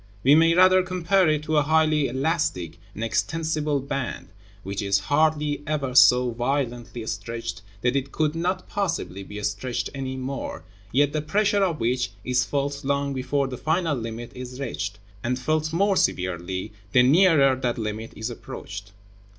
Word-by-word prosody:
We 135 - +6
may 165 +2 +5
rather 185 +1 +6
compare 185 0 +2
it 150 -1 +1
to 155 0 0
a - - +6
highly 155 -1 +3
elastic 130 - -1 0.2
and 110 - -4
extensible 155 +4 0
band, 135 -6 -4 0.3
which 100 +1 -4
is 100 -1 +2
hardly 150 -1 +2
ever 140 -4 -1
so 125 -1 +6
violently 120 -2 -2
stretched 115 -1 -5 0.2
that 125 +2 +1
it 135 0 -1
could 155 -1 0
not 180 +3 -2
possibly 170 - -2
be 105 +2 -8
stretched 115 +5 -2
any 130 -1 -4
more, 130 +1 -5 0.3
yet 145 +2 +3
the 155 - 0
pressure 200 +5 +1
of 170 -5 0
which 125 +2 0
is 125 -1 +1
felt 140 +2 -2
long 140 0 0
before 135 +1 0
the 130 -1 -6
final 160 -1 +1
limit 115 -1 -6
is 125 0 -8
reached, 100 -7 -4 0.3
and 125 +1 0
felt 155 +4 0
more 195 +4 +2
severely 95 - -1 0.2
the 125 - +6
nearer 145 -2 +5
that 125 -2 -2
limit 110 0 -4
is 110 +3 -4
approached. 100 -3 -8
135 Hz, 160 wpm, -25 LUFS, 120-155 Hz, 0.3 s, We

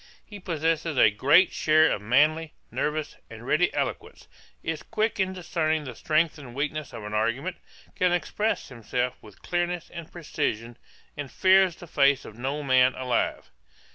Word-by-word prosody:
'He 205 -2 -10
possesses 165 -4 -1
a 110 - +6
great 145 - +4
share 155 0 +4
of 105 - -2
manly, 150 +8 +2 0.2
nervous, 150 0 -2
and - - -10
ready - - +2
eloquence; - - -4 0.4
is 160 -1 -3
quick 220 -1 -2
in 190 -1 +1
discerning 160 -4 -1
the 130 -3 -7
strength 155 +5 0
and 125 -4 -11
weakness 150 0 -3
of 110 - -8
an 105 0 -6
argument; 120 +11 -1 0.4
can 180 -1 +2
express 175 +5 -1
himself 125 +1 -2
with 105 -3 -16
clearness 175 -1 -2
and 170 -2 -9
precision, 145 -8 -3 0.4
and 145 -2 -6
fears 190 -2 +4
the 175 - -11
face 140 -4 +2
of 110 - -10
no 135 +5 -3
man 130 -1 +4
alive. 125 -2 -2
155 Hz, 160 wpm, -26 LUFS, 130-170 Hz, 0.4 s, a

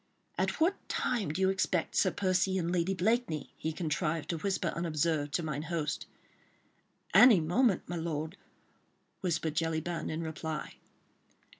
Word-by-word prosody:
"At - - -1
what 345 +5 +3
time 230 -9 0
do 160 +6 -2
you 190 0 +4
expect 190 -3 0
Sir 190 - +4
Percy 185 0 +1
and 170 -1 -1
Lady 180 +2 +1
Blakeney?" 190 - 0
he 160 - -3
contrived 160 0 -2
to 165 - -3
whisper 195 +2 0
unobserved, 160 -3 0
to 175 - 0
mine 150 -2 -2
host. 160 -2 -3 1.1
"Any 215 +1 +8
moment, 190 +7 +2
my 175 - -3
lord," 160 0 -3 0.8
whispered 165 -4 -1
Jellyband 165 +1 -1
in 160 +1 -3
reply. 160 -1 -5
170 Hz, 140 wpm, -31 LUFS, 160-190 Hz, 1.1 s, Any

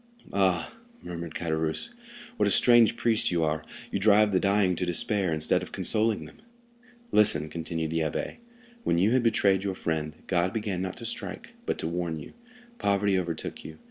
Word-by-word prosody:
"Ah," 95 -3 +1 0.3
murmured 85 -2 -6
Caderousse, 80 - -1 0.4
"what - - +2
a - - +2
strange 120 -2 +5
priest 115 -2 +2
you 85 -2 +1
are; 75 0 -1 0.3
you 100 - -1
drive 105 +1 +5
the 95 - +3
dying 100 -2 +2
to - - -1
despair, 90 +1 0
instead 80 -1 +1
of - - -8
consoling 110 0 +1
them." - - -14 0.7
"Listen," 75 -8 +4
continued 80 -1 -3
the 80 - 0
abbé. 80 -2 -2 0.5
"When 85 - +1
you 100 +6 +3
had 130 0 +3
betrayed 100 -4 +2
your 95 -2 -2
friend, 80 -3 -2
God 90 +1 0
began 105 -5 -2
not 95 -1 -4
to - - -7
strike, - - -6
but - - 0
to - - -3
warn 85 -1 -2
you. - - -11 0.5
Poverty 100 0 +2
overtook 85 -3 -4
you. 80 0 -9
90 Hz, 175 wpm, -27 LUFS, 80-105 Hz, 0.7 s, strange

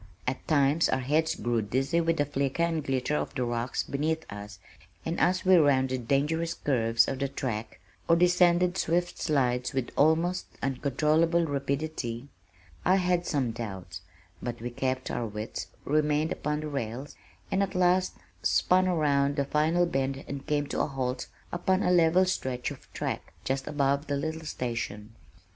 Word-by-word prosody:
At 130 +1 -3
times 145 +1 +3
our - - +2
heads 155 +5 +1
grew 120 -1 0
dizzy 135 +10 0
with 165 0 +1
the 145 - +2
flicker 140 +2 -1
and 165 -2 0
glitter 135 +1 0
of - - -3
the 125 -3 0
rocks 120 +1 -1
beneath 160 +3 -1
us 105 0 -8 0.5
and 165 +1 -2
as 185 +1 +2
we 185 -1 +7
rounded 130 -5 +2
dangerous 160 +5 +1
curves 115 -5 +2
of 135 - -3
the 140 - 0
track, 115 -7 -4 0.3
or 165 - +7
descended 180 +1 +4
swift 175 +2 0
slides 125 -5 +1
with 130 -2 -2
almost 165 +4 +2 0.2
uncontrollable 155 +5 +2
rapidity, 140 -3 -3 0.5
I 185 - +4
had 180 -2 +1
some 135 -6 0
doubts, 95 -7 -6 0.4
but 120 -1 -4
we 120 +2 -5
kept 130 +1 -2
our 115 - -2
wits, 105 +1 -5 0.2
remained 150 +1 +1
upon 150 0 -2
the 155 - -4
rails, 135 0 -4 0.4
and 190 - +2
at 195 -2 -1
last 180 0 +3 0.3
spun 185 +1 +3
round 145 -4 +2
the 140 -1 0
final 160 +5 +2
bend 135 -3 -2
and 140 +1 -6
came 145 -1 +1
to - - 0
a - - +1
halt 130 -2 -3 0.2
upon 185 +2 +1
a 180 - +2
level 175 +1 +5
stretch 130 -9 -2
of - - -12
track, - - -4
just 135 0 -2
above 140 0 +1
the 145 - 0
little 160 +2 -4
station. 115 -6 -4
145 Hz, 165 wpm, -28 LUFS, 130-165 Hz, 0.5 s, we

